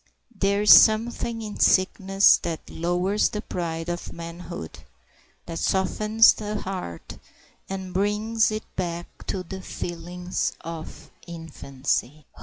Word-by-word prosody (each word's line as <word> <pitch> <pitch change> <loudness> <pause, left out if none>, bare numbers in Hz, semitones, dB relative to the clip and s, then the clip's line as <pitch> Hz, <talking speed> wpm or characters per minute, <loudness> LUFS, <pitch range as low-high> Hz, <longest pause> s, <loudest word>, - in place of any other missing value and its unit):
There 200 +1 +1
is 210 - +10
something 225 +1 +4
in 210 -1 -7
sickness 195 +1 +4
that 165 -2 -6
lowers 180 +5 +1
the 210 - -4
pride 165 -2 -4
of 175 0 -4
manhood, 170 - -8 0.7
that 165 -1 -5
softens 215 +4 +4
the 210 -1 -4
heart, 180 - -6 0.5
and 190 -1 -5
brings 210 +4 +1
it 215 0 -3
back 175 -2 -3 0.2
to 185 - -2
the 190 +2 -8
feelings 175 0 -4
of 165 -1 -8 0.2
infancy. 150 -3 -3
185 Hz, 115 wpm, -25 LUFS, 170-205 Hz, 0.7 s, is